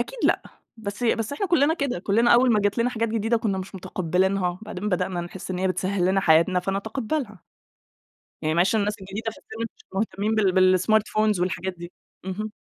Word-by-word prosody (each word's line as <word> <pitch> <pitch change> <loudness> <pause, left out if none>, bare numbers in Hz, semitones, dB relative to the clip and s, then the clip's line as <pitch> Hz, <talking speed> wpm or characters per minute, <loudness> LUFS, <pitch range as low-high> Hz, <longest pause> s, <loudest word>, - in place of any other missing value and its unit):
أكيد - - -4
لأ، - - +3 0.3
بس 210 +1 -6
بس 225 +2 0
إحنا 390 +7 -2
كلنا 320 -2 +3
كده، 280 - -2
كلنا 225 +6 +2
أوّل 245 0 +5
ما 210 - +3
جات 205 +3 0
لنا 245 +2 +2
حاجات 230 -1 -1
جديدة 225 +1 +1
كنا 205 -4 -1
مش 190 +1 -7
متقبلينها، 185 0 0
بعدين 210 -1 -4
بدأنا 180 -1 -1
نحس 175 +2 -7
إن 180 - -2
هي 190 0 +1
بتسهل 185 0 -1
لنا 190 +1 +3
حياتنا 175 +2 +4
فنتقبلها. 215 - -3 1.0
يعني 155 +1 0
معلش 180 +6 +3
الناس 210 0 0
الجديدة 200 +4 -5
في - - -14
السن 225 +1 -8
مش - - -21
مهتمين 210 +1 -1
بال 185 -3 +4
بالsmartphones 215 0 +2
والحاجات 185 +1 -2
دي، 175 0 -9 0.3
اهم. 210 +3 -4
200 Hz, 185 wpm, -24 LUFS, 185-225 Hz, 1.0 s, أوّل